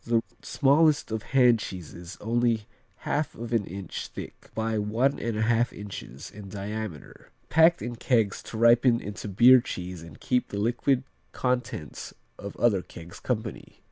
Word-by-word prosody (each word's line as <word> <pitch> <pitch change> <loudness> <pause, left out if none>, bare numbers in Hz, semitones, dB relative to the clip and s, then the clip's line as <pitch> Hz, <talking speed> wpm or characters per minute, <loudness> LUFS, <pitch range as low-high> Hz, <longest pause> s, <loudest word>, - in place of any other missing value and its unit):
The 115 -1 +1 0.2
smallest 145 0 +3
of 110 -1 -2
hand 125 0 +4
cheeses, 90 -2 -8
only 115 -1 +1 0.4
1/2 150 +1 -1
of 120 +1 -6
an 110 -4 +1
inch 95 0 -6
thick - - -10
by 110 0 -1
1 110 +6 +2
1/2 115 +1 +1
inches 95 -10 -8
in 100 -1 -10
diameter. 100 -4 -6 0.2
Packed 165 +2 +5
in 120 0 -5
kegs 115 -5 +1
to 110 - -7
ripen 115 +1 +5
into 105 -1 -7
beer 120 +6 +7
cheese 90 -5 -6
and 85 0 -12
keep 125 -1 0
the 100 - -6
liquid 120 +5 +1 0.3
contents 125 - -3 0.2
of 100 0 -7
other 105 -6 +3
kegs 85 -1 -12
company. 110 -4 -4
115 Hz, 145 wpm, -27 LUFS, 100-120 Hz, 0.4 s, beer